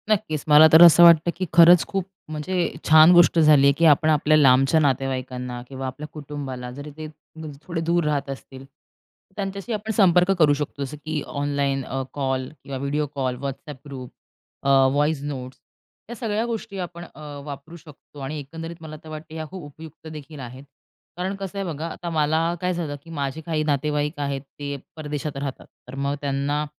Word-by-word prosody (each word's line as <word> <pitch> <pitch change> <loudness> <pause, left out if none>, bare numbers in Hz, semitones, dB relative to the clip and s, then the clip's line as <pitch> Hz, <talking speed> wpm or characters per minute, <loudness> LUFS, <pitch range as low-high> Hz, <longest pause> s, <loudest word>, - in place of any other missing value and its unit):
नक्कीच. 155 -8 0
मला 150 +1 +8
तर 160 - +9
असं 175 0 +8
वाटतं 170 0 +7
की 185 - -3
खरंच 170 0 +7
खूप 195 -2 -2 0.3
म्हणजे 170 +4 -2 0.2
छान 155 +2 +8
गोष्ट 175 -1 +5
झाली 150 -3 +6
आहे, 140 - +5
की 170 - +3
आपण 155 0 +5
आपल्या 155 0 +3
लांबच्या 135 +2 +5
नातेवाईकांना 130 -3 -2
किंवा 135 0 -6
आपल्या 135 +4 -7
कुटुंबाला 135 -4 -7
जरी 145 +4 -9
ते 155 -1 -6 0.3
म्हणजे 155 -3 -9
थोडे 170 -2 -3
दूर 170 +1 +1
राहत 145 -2 -1
असतील, 135 0 -9
तर 140 +6 -36
त्यांच्याशी 200 +3 -4
आपण 215 +1 -3
संपर्क 180 -3 +4
करू 150 -3 +5
शकतो. 145 -1 -4
जसं 140 +2 -7
की 155 -1 -2
ऑनलाईन 140 -1 -1
अ, 135 +1 -3
कॉल 130 -2 -2
किंवा 135 -1 -6
व्हिडिओ 140 +3 -1
कॉल, 130 -2 -1
WhatsApp 140 +1 -6
ग्रुप, 130 -3 -8 0.5
अ, 140 - 0 0.2
व्हॉईस 145 +1 +1
नोट्स. 130 -3 -6 0.5
या 240 - -6
सगळ्या 220 0 -2
गोष्टी 225 -3 -5
आपण 175 -1 -6
अ, 160 - -15 0.3
वापरू 145 +3 -9
शकतो 150 -2 -16
आणि 145 +3 -5
एकंदरीत 165 +4 -8
मला 155 -1 -8
तर 160 - -12
वाटते 155 +1 -9
या 160 -1 -4
खूप 185 -2 -9
उपयुक्त 155 +2 -12
देखील 150 -1 -10
आहेत. 130 +1 -9 0.5
कारण 185 +2 -3
कसं 195 0 -7
आहे? 195 - -2
बघा 155 +3 -5
आता 175 - -6
मला 160 +1 +1
काय 180 0 0
झालं 165 -4 -4
की 165 - -15
माझे 140 0 -4
काही 160 -3 -1
नातेवाईक 150 +1 -1
आहेत 140 -1 -2 0.2
ते 145 0 -4 0.2
परदेशात 150 -2 -5
राहतात. 140 -1 -5 0.2
तर - - -9
मग 140 +1 -2
त्यांना 145 +1 -1
150 Hz, 185 wpm, -23 LUFS, 140-165 Hz, 0.5 s, तर